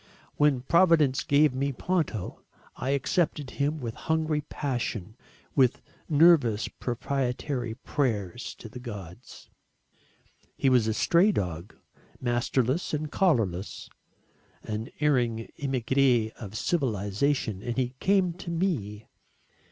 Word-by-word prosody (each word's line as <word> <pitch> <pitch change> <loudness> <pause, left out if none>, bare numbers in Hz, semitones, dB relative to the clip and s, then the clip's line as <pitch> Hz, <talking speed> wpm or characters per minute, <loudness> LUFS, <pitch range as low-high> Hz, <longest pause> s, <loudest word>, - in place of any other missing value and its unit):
When 145 -4 +3
Providence 160 -2 +4
gave 145 -1 +4
me 140 +2 -1
Ponto 140 - -2 0.3
I 130 - -3
accepted 140 0 0
him 150 +2 -1
with 115 -4 -4
hungry 160 +1 0
passion, 120 -7 -3 0.4
with 130 -3 +3 0.3
nervous 145 -9 +5
propitiatory 125 -1 -3
prayers 120 -5 -2
to - - -10
the 120 +3 -9
Gods. 105 -2 -10 1.1
He 135 - +3
was 120 -3 +4
a 110 - 0
stray 180 - +4
dog, 90 - -4 0.4
masterless 125 +5 0
and 150 0 -4
collarless, 110 - 0 0.7
an 110 +1 -4
erring 120 -6 +1
emigré 130 -3 +2
of 110 -2 -8
civilisation 110 - 0
and 120 +2 -4
he 125 -1 0
came 190 -3 +2
to 180 0 -8
me. 140 - -2
130 Hz, 110 wpm, -27 LUFS, 110-150 Hz, 1.1 s, nervous